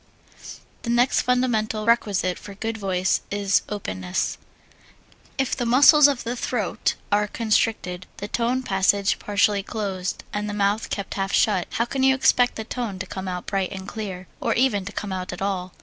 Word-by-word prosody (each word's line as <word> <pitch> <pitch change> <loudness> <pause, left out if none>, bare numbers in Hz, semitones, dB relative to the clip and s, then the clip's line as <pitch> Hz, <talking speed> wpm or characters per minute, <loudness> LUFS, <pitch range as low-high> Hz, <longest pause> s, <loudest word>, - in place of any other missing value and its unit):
The 235 - -5
next 240 +2 +3
fundamental 225 -4 0
requisite 205 -6 +1
for 200 - -10
good 225 +2 -3
voice 190 -3 0
is 200 -1 +2
2. 210 - -3
Openness 95 - -3 1.0
If 270 -1 0
the 250 - -2
muscles 280 +5 +7
of 275 -4 -1
the 235 +1 -3
throat 235 -5 -1 0.2
are 210 +1 +3
constricted, 215 -5 0
the 205 - -5
tone 245 +4 0
passage 195 -1 +2
partially 205 0 +2
closed, 195 -4 -4
and 210 0 -2
the 205 - -4
mouth 205 +1 0
kept 200 -3 -4
half 195 0 -2
shut, 195 -5 +2
how 235 - +1
can 265 +2 -3
you 265 0 +5
expect 260 -2 +3
the 220 - -4
tone 225 -4 -4
to 195 - -4
come 190 0 -6
out 180 -1 -4
bright 195 -2 -1
and 190 -1 -7
clear, 190 -4 -6
or - - 0
even 225 -6 +2
to 200 - -6
come 205 -2 -4
out 185 -1 -4
at - - -7
all? 190 -2 -2
205 Hz, 180 wpm, -24 LUFS, 190-235 Hz, 1.0 s, muscles